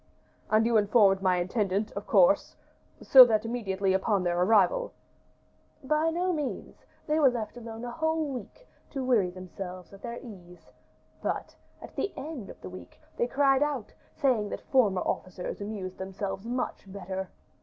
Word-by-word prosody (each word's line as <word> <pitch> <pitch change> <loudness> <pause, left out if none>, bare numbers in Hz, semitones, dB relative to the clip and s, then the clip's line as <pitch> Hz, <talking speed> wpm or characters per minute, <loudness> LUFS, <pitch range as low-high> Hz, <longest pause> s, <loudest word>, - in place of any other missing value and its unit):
"And 215 +1 +4
you 230 -1 +3
informed 205 -2 +4
my 185 -1 +2
intendant, 195 +3 -1
of - - -7
course? - - +4 0.5
so 260 -1 +10
that 225 -2 +1
immediately 200 -5 -1
on 195 0 +1
their 175 -1 0
arrival 225 - +3 0.5
" - - -37
"By 310 +2 +2
no 355 +2 0
means; 295 -5 -5 0.2
they 305 +1 +1
were 280 -3 +6
left 230 -3 -4
alone 230 -1 -8
a 240 - -5
whole 320 +3 0
week, 255 - -9 0.2
to 270 -2 -4
weary 225 -8 +3
themselves 185 0 -9
at 195 - -13
their 235 0 -6
ease; 180 -8 -13 0.5
but, - - -3 0.3
at - - -11
the 400 - -1
end 280 -8 -6
of - - -11
the - - -7
week, 185 - -12 0.2
they 240 - 0
cried 270 +1 +3
out, 290 -7 -1 0.2
saying 245 -8 +1
that - - -5
former 210 -9 +3
officers 185 +1 -4
amused 200 -3 -6
themselves 195 +2 -5
much 245 -5 -4
better. 190 -1 -5
215 Hz, 165 wpm, -28 LUFS, 190-260 Hz, 0.5 s, so